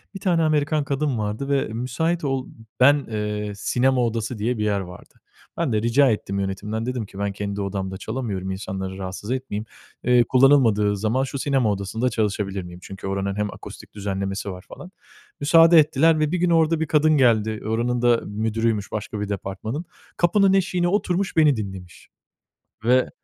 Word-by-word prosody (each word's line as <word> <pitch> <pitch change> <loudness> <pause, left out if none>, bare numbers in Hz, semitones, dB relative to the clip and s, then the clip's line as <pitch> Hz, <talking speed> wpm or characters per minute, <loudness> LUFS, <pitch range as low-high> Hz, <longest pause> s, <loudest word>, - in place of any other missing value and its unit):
1 - - -5
tane 175 -3 +1
Amerikan 155 -1 +1
kadın 140 -2 -1
vardı 110 +6 -3
ve 140 -1 +1
müsait 160 +9 -1
ol 135 -2 -1 0.3
ben, 140 +3 +7 0.2
ııı, 105 -1 -3
sinema 125 +5 +1
odası 115 0 -3
diye 115 +3 -1
bir 105 - -1
yer 105 -1 +1
vardı. 90 -2 -10 0.4
Ben - - 0
de 105 - +1
rica 125 +4 +4
ettim 100 -2 -2
yönetimden, 100 +3 -3
dedim 125 -3 -3
ki 95 - -12
ben 100 0 -1
kendi 100 0 -4
odamda 95 -1 -3
çalamıyorum 105 -5 -4
insanları 95 -1 -5
rahatsız 95 +3 -6
etmeyeyim, 125 -5 -3 0.4
ııı, 125 -1 +5
kullanılmadığı 120 -7 +4
zaman 110 +6 0
şu 135 +1 -4
sinema 130 -6 +1
odasında 100 +5 -1
çalışabilir 105 -4 -2
miyim? 90 0 -10
Çünkü 95 0 -8
oranın 95 0 -2
hem 105 0 -2
akustik - - -12
düzenlemesi 100 -1 -3
var 90 0 -10
falan. 185 - -11 0.5
Müsaade 165 +3 +6
ettiler 155 +2 +3
ve 155 -1 +1
bir 180 - 0
gün 175 0 +1
orada 165 -1 +3
bir 160 - -1
kadın 155 0 +3
geldi 110 -4 +2
oranın 120 +2 0
da 120 -1 +3
müdürüymüş 110 0 -1
başka 110 0 -4
bir 105 0 -3
departmanın. 105 - -4 0.3
Kapının 190 +3 +3
eşiğine 180 -2 +1
oturmuş 190 0 0
beni 150 -3 +5
dinlemiş 95 -5 -8 0.8
ve 125 +2 +3
115 Hz, 170 wpm, -23 LUFS, 100-140 Hz, 0.8 s, ben